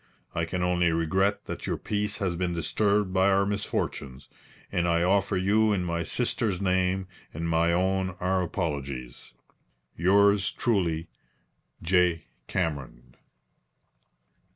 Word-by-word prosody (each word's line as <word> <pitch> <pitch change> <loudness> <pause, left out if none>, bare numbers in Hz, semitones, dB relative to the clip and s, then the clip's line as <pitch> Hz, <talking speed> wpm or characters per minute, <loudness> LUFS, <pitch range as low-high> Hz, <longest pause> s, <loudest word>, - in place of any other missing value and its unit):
I 80 - -1
can 90 +2 -2
only 90 -1 +2
regret 95 +5 +1
that - - -6
your - - -1
peace 105 0 -2
has 95 -5 -1
been 90 0 -1
disturbed 100 +4 +1
by 95 +1 +4
our 100 0 +3
misfortunes, 100 -9 -3 0.4
and 85 0 0
I 85 0 +2
offer 100 +1 +2
you 105 +4 +3
in 95 -3 0
my 85 -1 -2
sister's 105 0 -1
name 95 0 +1 0.3
and 85 +2 -3
my 85 +1 +2
own 95 +1 0
our 95 +1 +1
apologies." 70 -9 -4 0.6
"Yours 100 +3 +4
truly, 85 -8 0 0.8
"J. 90 -1 +2 0.2
CAMERON." 70 -8 -3
90 Hz, 125 wpm, -27 LUFS, 85-100 Hz, 0.8 s, by